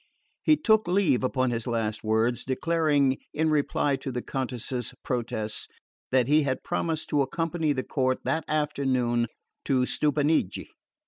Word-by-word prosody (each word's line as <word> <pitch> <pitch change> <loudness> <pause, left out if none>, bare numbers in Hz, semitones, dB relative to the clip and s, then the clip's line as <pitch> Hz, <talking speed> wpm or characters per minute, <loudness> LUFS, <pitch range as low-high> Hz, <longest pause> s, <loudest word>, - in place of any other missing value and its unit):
He 310 - +4
took 220 - +3
leave 175 -9 +2
upon 130 -1 +1
his 115 +1 -3
last 110 -3 -1
words, 110 +2 +1
declaring, 145 -1 +1 0.2
in 160 +1 +2
reply 145 -1 +1
to 135 0 -5
the 125 -1 -4
Countess's 125 -2 -4
protests, 110 -3 -3 0.4
that 130 -2 +3
he 150 +2 +5
had 130 -3 -2
promised 160 -2 -2
to 145 -2 +2
accompany 165 +3 -1
the 130 -2 -1
court 130 -1 0
that 160 0 0
afternoon 130 -6 +1 0.4
to 130 -3 +2
Stupinigi. 150 - +1
135 Hz, 140 wpm, -27 LUFS, 125-155 Hz, 0.4 s, he